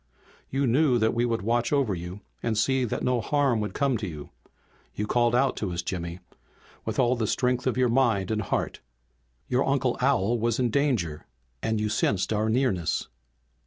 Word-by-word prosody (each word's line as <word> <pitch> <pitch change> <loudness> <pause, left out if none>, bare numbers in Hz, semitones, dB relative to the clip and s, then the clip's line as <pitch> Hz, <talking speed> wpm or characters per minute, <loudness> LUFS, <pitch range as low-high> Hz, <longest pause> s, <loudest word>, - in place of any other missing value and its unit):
"You 135 +1 0
knew 130 +1 +3
that 110 -1 +2
we 120 +1 +1
would 115 -3 -1
watch 120 +2 +1
over 140 -8 +2
you 90 +3 -6 0.2
and 110 -2 -1
see 130 +3 +2
that 115 - -3
no 125 -2 +1
harm 135 -1 +1
would 105 0 -3
come 140 -4 +1
to 105 -2 -4
you. 75 -4 -8 0.6
You 105 - -2
called 120 +1 +2
out 135 +1 +2
to 100 -4 -2
us, 85 0 -3
Jimmy, 85 -1 -4 0.7
with - - -3
all 125 0 +3
the 115 -3 -1
strength 125 +2 0
of 130 - 0
your 130 -1 +3
mind 115 -6 +2
and 110 -1 0
heart. 100 - -2 0.7
Your 125 +2 +2
Uncle 135 -2 +1
Al 120 -4 +2
was 115 0 +1
in 125 -3 +1
danger 115 - 0 0.3
and 110 -1 0
you 105 - 0
sensed 105 -1 0
our 110 +1 +1
nearness. 110 -8 0
120 Hz, 190 wpm, -26 LUFS, 105-130 Hz, 0.7 s, knew